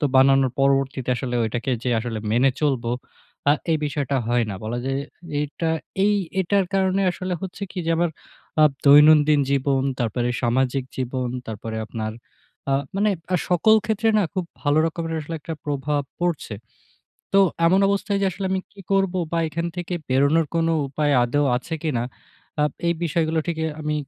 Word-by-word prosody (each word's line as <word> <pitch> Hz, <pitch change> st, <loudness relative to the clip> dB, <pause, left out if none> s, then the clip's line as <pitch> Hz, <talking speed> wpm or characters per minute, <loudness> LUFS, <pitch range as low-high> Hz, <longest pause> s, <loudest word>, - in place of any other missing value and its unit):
তো -, -, 0 dB
বানানোর 135 Hz, 0 st, +5 dB
পরবর্তীতে 135 Hz, -1 st, +1 dB
আসলে 125 Hz, -1 st, -3 dB
ওইটাকে 115 Hz, +3 st, -2 dB
যে 125 Hz, -, +1 dB
আসলে 115 Hz, -1 st, -4 dB
মেনে 125 Hz, +5 st, +4 dB
চলবো, 130 Hz, -6 st, 0 dB, 0.6 s
আ -, -, +7 dB, 0.2 s
এই 160 Hz, -, +4 dB
বিষয়টা 140 Hz, -2 st, -1 dB
হয় 120 Hz, 0 st, +2 dB
না। -, -, -4 dB
বলা 120 Hz, +3 st, -3 dB
যায় 135 Hz, +1 st, -1 dB, 0.4 s
এটা 150 Hz, +3 st, -3 dB, 0.4 s
এই 210 Hz, 0 st, +4 dB, 0.3 s
এটার 195 Hz, +2 st, +2 dB
কারণে 190 Hz, 0 st, +2 dB
আসলে 185 Hz, 0 st, -4 dB
হচ্ছে 190 Hz, +1 st, -6 dB
কি -, -, -7 dB
যে 165 Hz, -, +1 dB
আমার 175 Hz, 0 st, +1 dB, 0.5 s
আপ 150 Hz, -, +6 dB, 0.2 s
দৈনন্দিন 150 Hz, +1 st, +7 dB
জীবন, 135 Hz, -1 st, +1 dB, 0.2 s
তারপরে 120 Hz, 0 st, -1 dB
সামাজিক 130 Hz, +2 st, +1 dB
জীবন, 130 Hz, -1 st, -2 dB, 0.2 s
তারপরে 110 Hz, 0 st, -5 dB
আপনার 110 Hz, -1 st, -4 dB, 0.6 s
আ -, -, +4 dB, 0.2 s
মানে 210 Hz, +1 st, +3 dB, 0.2 s
আ -, -, +5 dB
সকল 180 Hz, +5 st, +5 dB
ক্ষেত্রে 220 Hz, 0 st, +1 dB
না -, -, +3 dB
খুব 185 Hz, -, -1 dB, 0.2 s
ভালো 145 Hz, 0 st, +2 dB
রকমের 165 Hz, 0 st, -3 dB
আসলে 160 Hz, +2 st, -6 dB
একটা 165 Hz, -, -5 dB
প্রভাব 145 Hz, 0 st, -1 dB, 0.2 s
পড়ছে। 170 Hz, -10 st, -1 dB, 0.8 s
তো 195 Hz, -, +5 dB, 0.3 s
এমন 185 Hz, +3 st, +4 dB
অবস্থায় 200 Hz, 0 st, 0 dB
যে -, -, +3 dB
আসলে 190 Hz, +1 st, -4 dB
আমি 190 Hz, 0 st, 0 dB
কি 205 Hz, -, -14 dB
করবো 195 Hz, -1 st, +2 dB
বা, 170 Hz, -, +1 dB
এখান 170 Hz, +2 st, -3 dB
থেকে 175 Hz, 0 st, -3 dB
বেরোনোর 140 Hz, +5 st, +3 dB
কোন 165 Hz, -1 st, +2 dB, 0.2 s
উপায় 145 Hz, +1 st, 0 dB
আদৌ 145 Hz, +5 st, +1 dB
আছে 145 Hz, +6 st, -4 dB
কিনা? 140 Hz, -7 st, 0 dB, 0.6 s
আপ 150 Hz, -, +2 dB, 0.2 s
এই 170 Hz, -, +2 dB
বিষয়গুলো 160 Hz, 0 st, 0 dB
ঠিকই 160 Hz, -2 st, -1 dB
আমি 150 Hz, 0 st, -1 dB
150 Hz, 170 wpm, -23 LUFS, 130-170 Hz, 0.8 s, আ